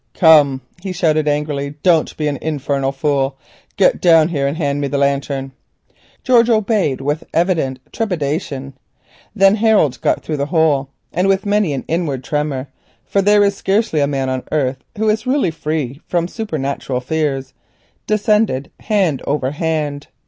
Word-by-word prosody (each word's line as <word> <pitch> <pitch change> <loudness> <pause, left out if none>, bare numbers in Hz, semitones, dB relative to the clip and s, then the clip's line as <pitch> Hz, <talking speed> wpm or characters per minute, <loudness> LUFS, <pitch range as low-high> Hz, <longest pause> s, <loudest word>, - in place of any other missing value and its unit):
"Come," 150 -6 +5 0.2
he 190 -1 -4
shouted 155 -4 +1
angrily, 145 -1 -1
"don't 170 -4 +2
be 150 - -1
a 140 -2 -2
fool; 135 -1 -1 0.4
get - - +3
down 165 -2 +5
here 140 -5 0
and 140 +3 -3
hand 145 -3 -1
me 140 - 0
the 140 - -2
lantern." 140 -1 -1 0.7
George 245 -2 +4
obeyed 210 - +1
with 145 +3 -2
evident 165 -7 +1
trepidation. 150 - -3 0.6
Then 195 +1 +5
Harold 215 - +3
scrambled - - -1
through 155 - -2
the 140 0 -1
opening 155 -5 +2 0.3
and 180 +3 +1
with 195 0 +1
many 205 -4 +1
an 135 - -4
inward 155 -6 -2
tremor, 145 -2 -2 0.4
for 200 - +1
there 205 +1 +4
is 200 0 +2
scarcely 195 -4 0
a 140 - +2
man 135 -2 -1
on 130 0 -1
the - - -25
earth 135 -2 -1
who 220 +1 0
is 220 +3 0
really 260 - +1
free 150 -4 -3
from 175 -1 0
supernatural 140 - -3
fears, 135 -1 -2 0.5
descended 210 -9 +1
hand 190 -10 0
over 140 -2 0
hand. 150 -2 -2
150 Hz, 155 wpm, -18 LUFS, 140-190 Hz, 0.7 s, Come